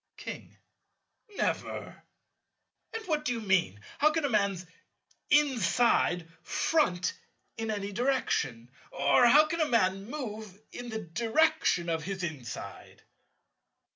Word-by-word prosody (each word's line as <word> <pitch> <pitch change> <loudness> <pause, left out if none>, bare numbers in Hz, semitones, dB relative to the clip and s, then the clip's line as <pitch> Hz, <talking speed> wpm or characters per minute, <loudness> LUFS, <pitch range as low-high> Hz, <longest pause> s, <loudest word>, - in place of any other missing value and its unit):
King. - - -8 0.8
Never. - - -3 0.9
And 450 -1 -6
what 305 -3 0
do 250 - 0
you 235 - -3
mean? 190 - +1 0.2
How 300 - +5
can 310 -1 0
a - - 0
man's 200 -5 0 0.6
inside 240 - +3
"front" 180 - +1 0.4
in 225 -1 -4
any 205 -1 -3
direction? 200 - -1 0.2
Or 140 - +4
how 300 +5 +7
can 330 +2 -2
a 310 - +2
man 195 -4 +2
move 220 -8 -6
in 245 0 -7
the 220 -1 -4
direction 230 - +1
of 165 -2 -2
his 190 -1 -4
inside? 140 -9 -7
220 Hz, 120 wpm, -29 LUFS, 180-285 Hz, 0.9 s, how